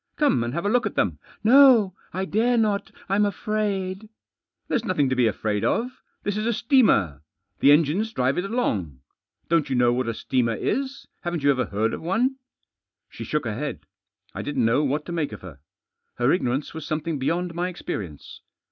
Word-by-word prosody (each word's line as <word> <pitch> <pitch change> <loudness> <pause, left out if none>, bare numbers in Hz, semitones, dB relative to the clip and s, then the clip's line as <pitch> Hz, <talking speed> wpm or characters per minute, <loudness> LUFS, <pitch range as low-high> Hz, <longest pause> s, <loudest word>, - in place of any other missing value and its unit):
Come 285 - +2
and 120 - -3
have 170 - -2
a - - +2
look 245 +3 +2
at - - -7
them." - - 0
" - - -27
No, 255 -9 +7 0.2
I 190 +1 -2
dare 235 +5 +1
not 210 -3 0 0.2
I'm 195 +2 +2
afraid." 205 -1 -2 0.3
" - - -58
There's 235 - 0
nothing 160 - +1
to 130 - 0
be 125 -2 +3
afraid 105 -1 -1
of. 250 +2 -1 0.2
This 205 0 -2
is 215 +2 -1
a 235 - +2
steamer. 210 - +3 0.4
The 140 - +6
engines 165 +9 +3
drive 135 - 0
it 180 - -2
along. 100 - -2 0.5
Don't 165 -4 +1
you 130 - 0
know 120 -1 +3
what 125 0 -1
a 115 - -2
steamer 120 -3 0
is? 275 - -2 0.2
Haven't 175 -4 -3
you 140 - +5
ever 130 -3 0
heard 110 +3 -1
ofone?" 235 +10 0 0.7
She - - -8
shook 150 -4 -2
her 110 - -2
head. 140 - -4 0.5
I - - -5
didn't 140 -5 -1
know 120 +6 +3
what 145 +2 -1
to - - -7
make 160 -8 -2
of 110 - -9
her. 85 -7 -11 0.6
Her 120 +3 +2
ignorance 135 -4 -1
was 160 -1 -6
something 155 0 -3
beyond 170 +6 -1
my 175 +2 -1
experience. 95 - -7
165 Hz, 195 wpm, -24 LUFS, 125-210 Hz, 0.7 s, No